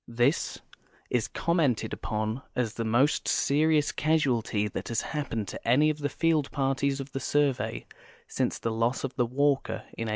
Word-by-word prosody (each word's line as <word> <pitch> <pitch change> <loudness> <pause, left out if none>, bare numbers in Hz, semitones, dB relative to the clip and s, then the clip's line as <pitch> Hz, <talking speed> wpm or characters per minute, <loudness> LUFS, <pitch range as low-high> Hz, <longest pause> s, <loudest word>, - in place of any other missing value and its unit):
This 120 +6 +1 0.5
is 115 -3 +1
commented 160 -9 0
upon 110 +3 -2
as 120 -4 0
the 115 - -3
most 120 +6 +2
serious 150 +1 +2
casualty 125 -9 +1
that - - -5
has 115 - -1
hapiiened 140 -8 -3
to - - -8
any 145 +6 +5
of 150 - -7
the 145 -1 -1
field 160 -3 +1
parties 135 0 0
of 135 0 -6
the 135 - -3
Survey 140 -2 0 0.4
since - - -1
the 115 - -2
loss 115 +3 0
of 135 - -3
the 125 -3 +1
Walker 140 +2 0
in 115 - -3
185G. - - -2
135 Hz, 170 wpm, -28 LUFS, 115-145 Hz, 0.5 s, any